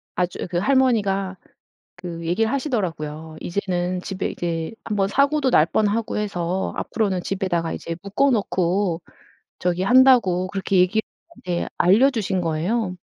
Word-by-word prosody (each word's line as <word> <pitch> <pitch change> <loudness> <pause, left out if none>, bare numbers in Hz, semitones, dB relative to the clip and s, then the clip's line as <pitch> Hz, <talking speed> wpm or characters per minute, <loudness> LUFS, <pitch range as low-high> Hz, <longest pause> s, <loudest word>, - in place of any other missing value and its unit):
아주 180 +1 -2
그 175 - -2
할머니가 200 -6 +1 0.6
그 170 -2 -7
얘기 180 +7 +1
하시더라고요. 165 - -3
"이제는 180 -1 -2
집에 190 0 -3
이제 165 +1 -3
1 215 - -3
번 195 -1 +1
사고도 280 +3 +2
날 155 - +5
뻔하고 215 +5 0
해서 185 -3 -2
앞으로는 195 -5 -1
집에 195 +1 -2
다가 165 -2 -1
이제 165 0 -5
묶어 215 +8 +1
놓고 190 -5 0 0.6
저기 180 0 0
한다."고 240 -7 +5
그렇게 195 0 -1
얘기 185 +4 +3 0.5
네 175 -1 -1
알려주신 210 -1 +3
거예요. 180 +5 -1
190 Hz, 300 characters per minute, -22 LUFS, 175-220 Hz, 0.6 s, 날